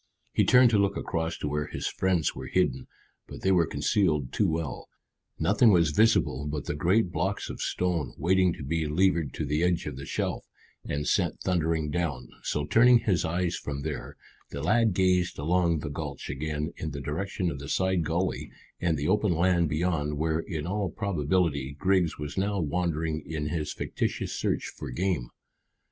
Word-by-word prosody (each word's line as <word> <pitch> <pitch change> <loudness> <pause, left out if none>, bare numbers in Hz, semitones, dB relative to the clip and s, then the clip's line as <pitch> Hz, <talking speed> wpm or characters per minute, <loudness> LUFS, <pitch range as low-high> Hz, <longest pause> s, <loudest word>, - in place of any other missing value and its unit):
He - - +3
turned 125 -1 +6
to 105 - +4
look 100 0 +1
across 80 -1 -2
to - - -3
where 75 +1 -1
his - - -5
friends 95 -4 +1
were - - -7
hidden, 65 +1 0 0.4
but - - -9
they 95 - +2
were 85 -4 +4
concealed 75 - +1
too - - +2
well; 80 -1 -3 0.5
nothing 120 - +4
was 85 -5 +4
visible 75 - +2
but 75 -1 -3
the - - -2
great 90 +6 +2
blocks - - -2
of - - -8
stone 85 -9 -1
waiting 90 +3 +3
to 80 - -8
be 80 +3 -1
levered 85 -1 +2
to 80 - -2
the 75 +3 0
edge 90 -1 +1
of 75 -3 -5
the 70 - -7
shelf - - -2 0.4
and 75 0 -3
sent - - +1
thundering 80 -4 0
down; 75 -7 -2
so 75 - -1
turning 120 +10 +6
his 95 -6 +1
eyes 85 +2 0
from 70 -1 -5
there, 75 -1 -5 0.3
the 70 +1 -6
lad 110 +2 +3
gazed 90 -1 +2
along 85 +1 +1
the 75 - -4
gulch - - -5
again 75 +3 -3
in 80 - -4
the 70 -1 -6
direction 85 +5 -2
of 70 - -6
the 70 - -7
side 95 -2 +1
gully 85 +4 -1 0.3
and 85 -3 +1
the 70 +1 -2
open 105 -4 +2
land 85 -1 +2
beyond, 75 -2 0
where 80 +1 0
in 80 -3 -4
all 100 +1 -1
probability 80 -7 0
Griggs 95 -3 +2
was 75 +5 -4
now 100 +1 0
wandering 80 -1 -1
in 75 -1 -3
his 75 -2 -2
fictitious - - -3
search - - -1
for - - -7
game. 80 -1 -1
80 Hz, 185 wpm, -28 LUFS, 75-90 Hz, 0.5 s, turned